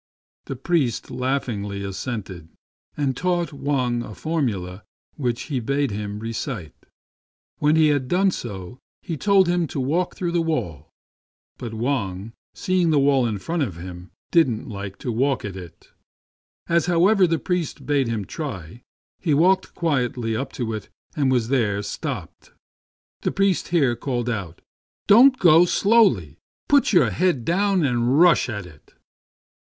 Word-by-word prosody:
The 135 - -5
priest 135 -2 -1
laughingly 115 -7 -2
assented, 95 -4 -6 0.5
and 140 -3 0
taught 175 0 -1
Wang 130 -4 -1
a 110 -3 -8
formula 110 - -3 0.3
which 125 -5 -2
he 135 -2 -3
bade 140 +3 -1
him 105 0 -4
recite. 115 - -5 0.9
When 150 +1 +3
he 160 -1 +5
had 140 -3 0
FROM 180 - +2
A - - +2
CHINESE 195 -2 +3
STUDIO. 120 - -6
21 90 -1 -8
done - - -14
so - - -30 0.2
he 170 - -4
told 195 +1 +4
him 175 -1 +1
to 145 - -5
walk 160 +8 -1
through 175 -2 -2
the 170 0 +1
wall; 85 - -3 0.7
but 115 -2 -6
Wang, 110 -4 -2 0.2
seeing 185 -2 +1
the 155 - +3
wall 135 -3 +3
in 110 -3 -2
front 165 - -3
of 115 - -2
him, 90 +1 -9 0.2
didn't 130 -10 +2
like 100 -2 -7
to 125 - -4
walk 130 +2 0
at 100 -2 -6
it. 90 -3 -12 0.8
As, 170 +1 +2
however, 185 +3 +4
the 165 0 +1
priest 180 -1 -3
bade 140 -3 +1
him 110 -4 -2
try, 115 - -7 0.4
he 155 -5 +1
walked 185 +5 +2
quietly 125 -8 -1
up 135 +3 -3
to 115 -3 -3
it 105 -2 -6 0.3
and 140 -3 +1
was 120 -3 +1
there 105 -6 +1
stopped. - - -6 0.7
The - - -1
priest 195 -2 +1
here 140 -8 +2
called 120 -1 -2
out, 95 -7 -5 0.2
" - - -94
Don't 250 +6 +7
go 170 -3 +6
so - - 0
slowly. 130 - +3 0.3
Put 285 -1 +4
your 180 - +4
head 170 -10 0
down 195 0 +2
and 125 +2 +1
rush 175 -6 +5
at 100 -4 -5
it." 80 -4 -18
130 Hz, 165 wpm, -23 LUFS, 110-165 Hz, 0.9 s, Don't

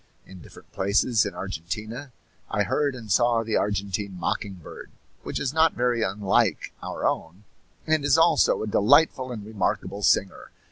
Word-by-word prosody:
In 95 -2 -13
different - - -16
places 100 +3 +2
in - - -7
Argentina 110 - -6 0.4
I 105 - +1
heard 140 +7 0
and 110 -4 -8
saw 115 +3 +3
the 110 -1 -2
Argentine 100 -1 -2
mocking 100 +2 -2
bird, 85 - -11 0.3
which - - -4
is 135 0 -2
not 160 +1 +4
very 120 -1 0
unlike 100 -1 0
our - - -5
own, 85 +5 -4 0.4
and 155 -2 +1
is 145 0 +3
also 165 -7 +3
a - - -4
delightful 130 +5 +3
and 110 -4 -7
remarkable 105 -1 -2
singer. 100 -1 +1
110 Hz, 155 wpm, -25 LUFS, 100-125 Hz, 0.4 s, not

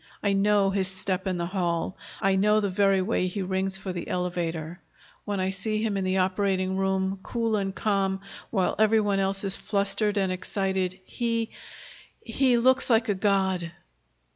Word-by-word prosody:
I 200 -1 +2
know 200 0 +3
his 190 -1 0
step 190 0 -2
in 185 -1 0
the 170 - -1
hall. 175 -1 -1 0.3
I 195 0 +3
know 210 +2 +4
the 200 -2 -1
very 195 0 +3
way 185 -2 0
he 190 +2 -3
rings 190 +1 -1
for 190 -1 -5
the 175 - -5
elevator. 175 -2 -3 0.4
When 205 -2 -2
I 185 0 0
see 215 +3 -1
him 215 -3 0
in 195 - -1
the 185 0 0
operating 190 0 +1
room, 190 0 0
cool 230 0 -1
and 195 -2 -2
calm 195 -2 0 0.3
while 190 -5 +1
every 220 +1 +5
one 205 -2 +1
else 195 0 0
is 195 -1 -1
flustered 205 +1 0
and 190 -2 +1
excited, 190 0 -2
he 230 0 -1 0.7
he 250 +1 +2
looks 260 +3 +3
like 225 -1 +3
a - - +4
god." 190 -3 0
195 Hz, 175 wpm, -26 LUFS, 185-205 Hz, 0.7 s, every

